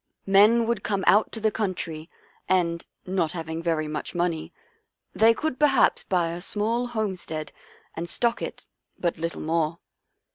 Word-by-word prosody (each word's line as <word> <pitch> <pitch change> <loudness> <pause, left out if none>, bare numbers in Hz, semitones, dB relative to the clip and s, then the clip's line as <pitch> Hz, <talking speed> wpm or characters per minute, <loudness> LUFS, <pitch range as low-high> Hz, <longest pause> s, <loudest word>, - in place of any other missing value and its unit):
" - - -51
Men 210 +4 +5
would 230 -3 -1
come 200 -2 -1
out 210 +2 +5
to 225 - -4
the 220 0 +2
country, 170 -7 -3 0.4
and, 170 -2 +1 0.2
not 180 -3 0
having 160 -1 -4
very 165 -2 0
much 150 +3 -5
money, 170 -2 -1 0.6
they 225 +1 +6
could 285 +3 -2
perhaps 285 -4 +4
buy 175 -3 +1
a 170 +1 -6
small 225 +5 -1
homestead 190 -9 -3 0.4
and 170 +1 -4
stock 235 +4 +1
it, - - -6 0.3
but 170 -2 -1
little 165 +1 -3
more. 160 0 0
185 Hz, 155 wpm, -25 LUFS, 165-220 Hz, 0.6 s, they